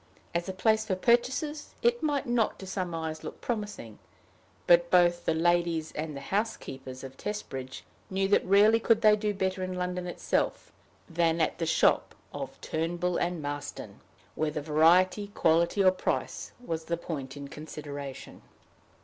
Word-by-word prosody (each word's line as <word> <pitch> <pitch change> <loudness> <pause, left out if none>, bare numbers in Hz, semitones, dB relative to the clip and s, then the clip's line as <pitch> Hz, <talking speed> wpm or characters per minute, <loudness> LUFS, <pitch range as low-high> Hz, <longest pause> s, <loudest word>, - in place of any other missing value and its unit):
As 170 +2 -1
a - - 0
place 220 +3 +2
for 210 -4 -1
purchases 250 +8 +1
it 475 0 +3
might 290 -3 0
not 240 -2 +1
to 190 - -9
some 185 -3 -3
eyes 160 -1 -4
look - - -7
promising, 205 - -5 0.7
but 175 0 +5
both 175 -1 +4
the - - +2
ladies 170 -1 +1
and 155 -1 -5
the - - -7
housekeepers 135 - -4
of 135 0 -8
Testbridge 135 -11 -5 0.3
knew 195 0 0
that 205 - +4
rarely 205 +4 +5
could 230 -1 +3
they 215 -1 +7
do 210 0 -1
better 190 -1 -2
in 185 0 -3
London 180 0 -3
itself 175 - -1 0.4
than 165 -1 +1
at 160 - 0
the 165 - -1
shop - - +3 0.2
of - - -6
Turnbull 175 +2 -1
and 175 -3 -1
Marston, 145 0 -6 0.3
whether 155 -1 -1
variety, 170 +7 +4
quality, 170 +4 +3
or 185 - +7
price, 185 - -3
was 165 -9 -4
the 170 - -1
point 140 -5 -6
in 140 0 -7
consideration. 145 -2 -8
175 Hz, 160 wpm, -29 LUFS, 155-205 Hz, 0.7 s, they